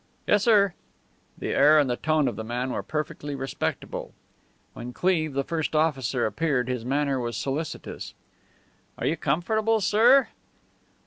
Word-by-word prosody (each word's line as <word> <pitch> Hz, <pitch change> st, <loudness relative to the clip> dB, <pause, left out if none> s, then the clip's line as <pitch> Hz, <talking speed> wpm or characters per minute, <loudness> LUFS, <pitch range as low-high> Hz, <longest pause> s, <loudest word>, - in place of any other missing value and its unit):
"Yes, 205 Hz, -, +3 dB
sir." 200 Hz, -5 st, +4 dB, 0.6 s
The -, -, -4 dB
air 150 Hz, +2 st, +5 dB
and 145 Hz, -2 st, +4 dB
the 125 Hz, -, 0 dB
tone 155 Hz, +1 st, +1 dB
of 120 Hz, -, -2 dB
the 110 Hz, -, -5 dB
man 125 Hz, +3 st, -3 dB
were -, -, -2 dB
perfectly 150 Hz, -1 st, -4 dB
respectful. 135 Hz, -1 st, -4 dB, 0.6 s
When 125 Hz, +1 st, -8 dB
Cleve, 160 Hz, -4 st, +1 dB
the 140 Hz, 0 st, 0 dB
first 160 Hz, +1 st, -2 dB
officer, 135 Hz, -6 st, +1 dB
appeared 125 Hz, +2 st, 0 dB
his 125 Hz, -3 st, -3 dB
manner 140 Hz, +1 st, 0 dB
was 120 Hz, -1 st, -3 dB
solicitous. 140 Hz, +3 st, -5 dB, 0.8 s
"Are -, -, -4 dB
you 160 Hz, -, +1 dB
comfortable, 215 Hz, +10 st, +1 dB
sir?" 230 Hz, +6 st, +5 dB
150 Hz, 145 wpm, -26 LUFS, 130-170 Hz, 0.8 s, air